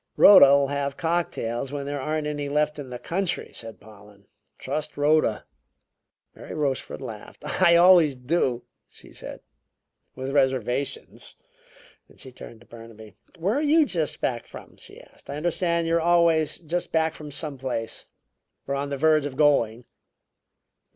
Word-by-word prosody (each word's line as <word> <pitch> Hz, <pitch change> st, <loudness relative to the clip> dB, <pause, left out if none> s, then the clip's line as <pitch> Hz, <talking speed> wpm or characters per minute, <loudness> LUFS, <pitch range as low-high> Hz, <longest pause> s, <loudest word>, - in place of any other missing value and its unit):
"Rhoda'll 140 Hz, -8 st, +8 dB
have 140 Hz, 0 st, -3 dB
cocktails 150 Hz, -7 st, -2 dB
when 140 Hz, -1 st, -4 dB
there 145 Hz, -1 st, -4 dB
aren't 155 Hz, +2 st, -2 dB
any 145 Hz, -1 st, -3 dB
more 140 Hz, -, -5 dB
left 150 Hz, 0 st, +1 dB
in 135 Hz, -3 st, -7 dB
the 125 Hz, -, -6 dB
country," 180 Hz, +6 st, -3 dB
said 115 Hz, -1 st, -7 dB
Pollen. 105 Hz, -1 st, -17 dB, 0.3 s
"Trust 155 Hz, 0 st, -4 dB
Rhoda!" 145 Hz, -6 st, +2 dB, 0.9 s
Mary -, -, -10 dB
Rochefort 140 Hz, -3 st, -3 dB
laughed. 110 Hz, -5 st, -10 dB, 0.2 s
"I 170 Hz, -2 st, +6 dB
always 170 Hz, -5 st, +6 dB
do," 125 Hz, -1 st, -1 dB, 0.3 s
she -, -, -15 dB
said, -, -, -9 dB, 0.7 s
"with 130 Hz, +1 st, -5 dB
reservations." 130 Hz, -1 st, -1 dB, 0.8 s
She 130 Hz, -, -7 dB
turned 120 Hz, -2 st, -12 dB
to -, -, -18 dB
Burnaby. 115 Hz, -3 st, -13 dB, 0.2 s
"Where 180 Hz, +6 st, 0 dB
are 285 Hz, -, 0 dB
you 310 Hz, +1 st, +4 dB
just 165 Hz, -, -2 dB
back 120 Hz, -2 st, -2 dB
from?" -, -, -12 dB
she -, -, -11 dB
asked. -, -, -19 dB
"I 140 Hz, -, -4 dB
understand 170 Hz, +1 st, 0 dB
you 165 Hz, 0 st, +2 dB
are -, -, 0 dB
always 170 Hz, -2 st, +3 dB
just 175 Hz, +2 st, -4 dB
back 160 Hz, 0 st, +1 dB
from 150 Hz, -2 st, -10 dB
some 145 Hz, -1 st, -4 dB
place, 125 Hz, -4 st, -4 dB, 0.6 s
or 140 Hz, -, -2 dB
on 140 Hz, +1 st, -2 dB
the 140 Hz, -, -3 dB
verge 155 Hz, 0 st, +3 dB
of 130 Hz, -2 st, -9 dB
going." 125 Hz, -6 st, +2 dB
145 Hz, 155 wpm, -25 LUFS, 130-165 Hz, 0.9 s, Rhoda'll